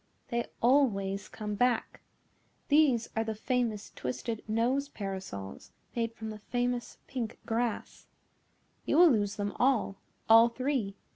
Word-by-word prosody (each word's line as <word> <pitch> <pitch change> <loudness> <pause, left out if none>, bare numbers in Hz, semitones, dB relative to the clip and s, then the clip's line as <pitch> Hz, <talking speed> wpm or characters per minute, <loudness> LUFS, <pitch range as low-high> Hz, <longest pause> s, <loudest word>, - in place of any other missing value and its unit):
"They 235 0 -1 0.2
always 205 -7 +2
come 210 -1 -5
back. 245 +2 0 0.7
These 285 -6 +4
are 225 - +1
the 220 -1 -3
famous 225 -2 -1
twisted 215 - -4
nose 250 +6 +1
parasols 190 - -7 0.2
made 230 -1 -1
from 220 -1 -6
the 215 - -8
famous 245 +2 -2
pink 235 -4 -4
grass. 230 0 -2 0.8
You 290 - +1
will 345 -2 +8
lose 205 -3 +1
them 205 0 -2
all, 245 -6 +2 0.3
all 225 +1 +8
three. 255 -5 -2
230 Hz, 130 wpm, -30 LUFS, 210-250 Hz, 0.8 s, will